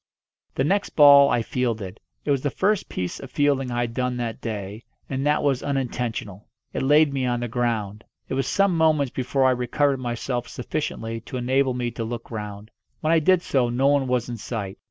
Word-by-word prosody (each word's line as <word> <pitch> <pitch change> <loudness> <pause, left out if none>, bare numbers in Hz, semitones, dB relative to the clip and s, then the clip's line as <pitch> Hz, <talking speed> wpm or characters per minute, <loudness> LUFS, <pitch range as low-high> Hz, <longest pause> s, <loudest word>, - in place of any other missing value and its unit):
The 135 - +1
next 195 +8 0
ball 140 -2 +8
I 120 -2 +1
fielded. 110 -6 -3 0.3
It 145 - +1
was 140 -2 +1
the 145 - 0
first 200 +7 0
piece 90 -1 -4
of 135 - -9
fielding 140 -1 +1
I 120 0 -1
had 120 -1 -2
done 125 0 -1
that 115 -2 -4
day, 105 -1 -5 0.2
and 135 +1 -2
that 150 - +2
was 135 -3 +1
unintentional. 120 -7 -3 0.3
It - - -2
laid 145 +1 +4
me 130 -2 0
on 120 -1 -1
the 120 - -2
ground. 110 -3 -2 0.2
It - - -4
was 135 -1 -1
some 195 +1 +2
moments 155 -5 +2
before 130 +1 0
I 130 - +5
recovered 135 +3 +1
myself 120 0 -3
sufficiently 115 0 -4
to 125 - -7
enable 130 +1 +1
me 120 -1 -2
to 115 - -5
look 115 +1 -6
round. 105 -1 -7 0.3
When 155 +1 +2
I 165 - +5
did 180 +3 +3
so 125 -3 +1
no 125 +3 0
one 140 -2 +2
was 125 -2 0
in 120 -1 -5
sight. 105 -3 -5
125 Hz, 205 wpm, -24 LUFS, 115-140 Hz, 0.3 s, ball